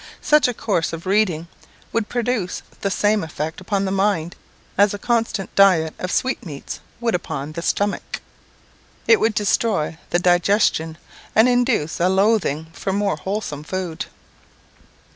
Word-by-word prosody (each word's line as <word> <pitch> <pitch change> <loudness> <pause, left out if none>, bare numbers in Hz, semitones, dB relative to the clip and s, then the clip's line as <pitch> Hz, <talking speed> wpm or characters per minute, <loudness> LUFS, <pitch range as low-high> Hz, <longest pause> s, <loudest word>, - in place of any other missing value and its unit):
Such 300 -2 +5
a 245 - -1
course 180 -10 -1
of 165 +2 -6
reading 185 -5 +1 0.5
would 230 -2 0
produce 240 -6 -1 0.2
the 200 - 0
same 205 +2 +2
effect 160 +1 -5
upon 195 +1 -1
the 190 - -1
mind 190 -4 0 0.4
as 205 +1 +4
a - - -5
constant 230 -3 -1
diet 180 -5 +5
of 185 - -3
sweetmeats 170 - -3 0.2
would 235 -2 0
upon 155 -4 -3
the 170 +2 -5
stomach; 205 +4 -1 0.9
it 450 - +6
would 220 -1 +1
destroy 205 -6 +1
the - - +2
digestion, 175 -2 +2 0.4
and 220 +3 +6
induce 245 - +1
a 175 +2 +3
loathing 190 -6 +2
for 195 - -3
more 200 +1 +1
wholesome 190 -7 -4
food. 180 0 -4
195 Hz, 145 wpm, -21 LUFS, 165-215 Hz, 0.9 s, it